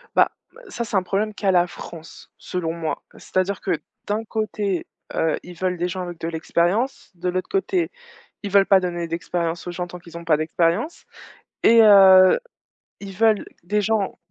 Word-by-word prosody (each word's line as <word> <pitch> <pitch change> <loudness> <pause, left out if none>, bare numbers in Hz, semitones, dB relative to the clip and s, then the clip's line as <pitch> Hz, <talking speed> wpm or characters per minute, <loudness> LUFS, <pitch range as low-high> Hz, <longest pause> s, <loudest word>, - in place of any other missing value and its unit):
Bah, - - +5 0.2
b - - -18
heu, - - -15
ça 240 - -3
c'est 220 - -5
un 190 - +1
problème 205 +3 -1
qu'à 200 -2 0
la 175 -1 +3
France 165 -2 -11
selon 165 -3 -3
moi. 165 -2 -4
C'est-à-dire 185 +1 -2
que 160 - -1 0.3
d'un 210 +2 -1
côté, 215 -4 -2 0.3
heu, 160 -1 +1
ils 180 - -10
veulent 180 0 -1
des 175 +1 -1
gens 185 +1 -4
avec 175 -2 -7
de 165 - -4
l'expérience, 175 +9 -1
de 180 +1 -2
l'autre 185 +1 -3
côté 385 -3 0 0.5
ils 200 - -3
veulent 200 0 +5
pas 195 - +6
donner 175 -1 -3
d'expérience 170 +1 -3
aux - - -3
gens 175 0 -4
tant 180 +1 -9
qu'ils 170 -1 -11
ont 170 - -9
pas 160 - +4
d'expérience 170 - -1 0.6
et 230 0 +7
heu, 190 - +8 0.6
ils 195 -1 -8
veulent 220 0 +3 0.2
des 210 +4 0
gens 210 -1 0
185 Hz, 190 wpm, -22 LUFS, 170-210 Hz, 0.6 s, heu